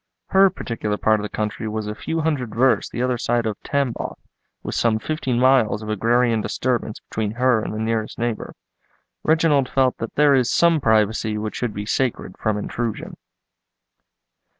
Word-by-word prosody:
Her 195 0 +6
particular 110 - -3
part 110 0 +2
of - - -4
the 105 - -4
country 110 +1 -3
was 110 0 -3
a 105 - -3
few 160 +8 -3
hundred 145 -9 -2
versts 130 +2 +2
the 120 - -3
other 125 -1 0
side 120 0 0
of 110 -2 -3
Tamboff, 140 -5 -2 0.5
with - - -4
some 115 -2 +2
fifteen 130 -1 -2
miles 125 -5 +3
of 110 - -6
agrarian 115 +2 +2
disturbance 120 -2 -2
between 110 -1 -3
her 125 -1 +2
and - - -4
the 105 - -5
nearest 110 0 -2
neighbour. 120 -2 -3 0.7
Reginald 155 -4 +2
felt 130 -2 +1
that 115 - -5
there 145 -1 +5
is 130 -2 +3
some 170 0 +3
privacy 110 -1 +2
which 105 0 -4
should 120 -4 -3
be 105 +1 -4
sacred 115 -5 -1
from 110 -1 0
intrusion. 115 +1 -4
115 Hz, 175 wpm, -22 LUFS, 110-130 Hz, 0.7 s, Her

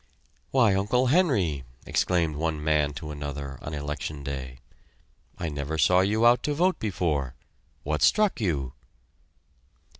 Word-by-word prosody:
"Why, 115 -7 +4
Uncle 105 +7 +1
Henry!" 100 - +2 0.2
exclaimed 85 -4 +1
one 80 0 -2
man 75 -2 +2
to 75 +1 -7
another 70 -2 -6
on 75 - -5
election 75 0 -5
day. 65 -3 -5 0.8
"I 85 - -3
never 75 +1 -3
saw 90 +5 +4
you 105 +4 +2
out 120 0 +5
to 150 - -1
vote 180 +4 +2
before. 80 - -1 0.5
What 75 0 -2
struck 210 - +3
you?" 70 - -1
80 Hz, 130 wpm, -26 LUFS, 70-105 Hz, 0.8 s, out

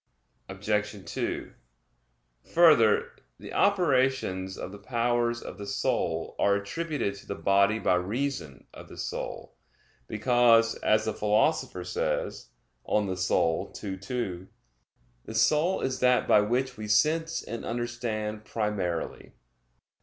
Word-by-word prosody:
Obj. 105 +1 -2
2: - - -4 1.0
Further, 155 -11 +5 0.3
the - - -10
operations 130 - +1
of 95 - -6
the 100 - -10
powers 120 +1 0
of - - -9
the 100 - -6
soul 100 +1 -1
are 100 - +4
attributed 145 +3 -2
to - - -15
the 100 - -4
body 100 +2 +3
by 110 - +1
reason 100 - -2
of - - -12
the - - -12
soul; - - -5 0.5
because, 115 0 +4
as 110 0 +2
the 110 - -1
Philosopher 105 -3 +1
says 90 -7 -2 0.3
(De - - -6
Anima 100 -3 +1 0.7
ii, 95 -2 -4
2), 95 -3 -4 0.8
"The - - -8
soul 160 +5 +3
is 130 -1 -2
that 125 0 +3
by 105 - +6
which 125 +5 -1
we 105 0 -6
sense 160 +9 +2
and 115 - -6
understand 115 -3 -3
primarily." 105 -7 -3
110 Hz, 125 wpm, -28 LUFS, 100-125 Hz, 1.0 s, by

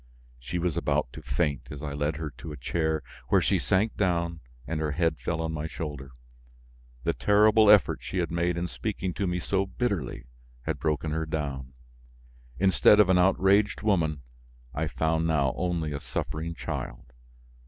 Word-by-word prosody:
She 75 +8 -4
was 85 -2 -1
about - - 0
to - - -8
faint 75 -6 -1
as 75 0 -8
I 70 -2 -4
led 75 +2 -1
her 80 -1 -5
to 65 +5 -9
a 75 - -7
chair 80 +3 -1 0.2
where - - +4
she - - +2
sank 105 +4 +1
down 85 -3 0 0.3
and 80 +2 -3
her 75 -2 -1
head 80 0 0
fell 85 -1 -2
on 80 - -2
my 80 0 -3
shoulder. 75 -5 -6 0.9
The - - +1
terrible 105 +1 +5
effort 105 -2 +6
she - - -5
had 85 -2 0
made 85 +1 0
in 85 +1 -1
speaking 95 -2 -3
to 100 - -1
me 90 0 -1
so 95 +2 0
bitterly 95 - -2 0.4
had - - -3
broken 80 0 -1
her 80 0 -2
down. 70 -4 -4 0.8
Instead 95 +2 +5
of 105 -3 +6
an 90 -1 +5
outraged 95 +3 +3
woman, 80 -9 +1 0.5
I 80 +2 -1
found 80 +1 0
now 70 -5 +2
only 85 -4 -1
a 70 -1 -4
suffering 80 +2 -4
child. - - -6
80 Hz, 175 wpm, -27 LUFS, 75-95 Hz, 0.9 s, effort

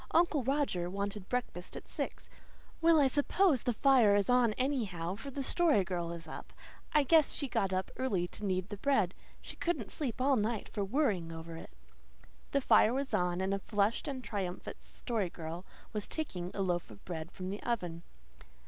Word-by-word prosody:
Uncle 335 -4 +4
Roger 265 -10 0
wanted 200 +1 -3
breakfast 240 -8 -3
at - - -10
six. - - -4 0.5
Well, 330 -1 +6
I 285 - +6
suppose 290 - +3
the 245 - +1
fire 240 -4 +5
is 205 +3 +2
on 245 -3 +4
anyhow, 210 -10 -1
for 225 +8 -7
the 275 0 -4
Story 305 - +3
Girl 175 -2 -3
is 165 -1 -6
up. - - -8 0.4
I 300 -1 +4
guess 315 +1 +5
she 280 - -2
got 195 -6 0
up 185 0 -1
early 200 -9 0
to - - -9
knead 185 -1 -1
the 205 - -5
bread. 210 -7 +2 0.3
She - - -7
couldn't 345 +1 -1
sleep 265 -8 -3
all 265 +1 +3
night 220 0 -1
for 205 - -2
worrying 195 - +1
over 165 0 -7
it." 165 - -9 0.8
The 280 - +1
fire 240 -2 +5
was 275 0 -2
on, 180 0 +1
and 190 +1 0
a 200 - 0
flushed 205 +2 0
and 265 -3 -4
triumphant 190 -6 -4
Story 220 -7 -3
Girl 170 +2 -7 0.3
was 210 -1 -1
taking 180 - -3
a 195 - 0
loaf 175 -2 -1
of 105 -2 -14
bread 165 -1 -5
from 185 0 -5
the 205 - -5
oven. 175 -9 -2
205 Hz, 190 wpm, -33 LUFS, 180-270 Hz, 0.8 s, Well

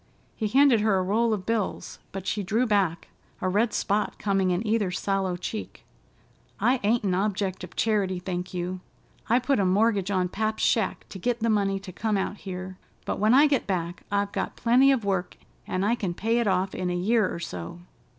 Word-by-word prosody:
He 220 - -1
handed 260 -1 +5
her 210 -2 +3
a 185 - +1
roll 225 +5 +1
of 200 -4 -2
bills, 225 -2 -2
but 195 -1 -6
she 210 - -1
drew 220 +6 +1
back, 195 -7 0 0.3
a 185 - -1
red 210 +5 +2
spot 210 +1 -1
coming 195 -2 +1
in 180 +5 0
either 215 -3 +1
sallow 190 0 -1
cheek. 215 +4 -6 0.7
"I 255 +1 +3
ain't 225 +3 +2
an 190 -3 +1
object 190 -1 -1
of 180 - -9
charity, 200 -4 +1
thank 180 0 -4
you. 180 +1 -3 0.5
I 235 - +5
put 255 0 +1
a - - +3
mortgage 200 +1 +2
on 185 -2 +1
pap's 215 +4 -2
shack 225 - +1
to 195 - -8
git 240 +4 -1
the 230 0 +2
money 200 -2 +1
to 195 -2 -9
come 210 +3 -1
out 195 +2 -2
here, 185 -1 -7 0.3
but - - -2
when 215 +4 +4
I 285 +3 +7
get 285 -3 +1
back 175 -2 -2
I've 200 0 0
got - - -3
plenty 250 +4 +4
of 245 -6 0
work, 190 -2 -1 0.3
an' 185 - -1
I 215 +3 +2
can 190 -7 -2
pay 225 +5 +1
it 235 - 0
off 190 0 +1
in 185 -1 -2
a 175 - -1
year 210 +3 +2
or - - -4
so." 90 - -7
200 Hz, 210 wpm, -26 LUFS, 185-225 Hz, 0.7 s, I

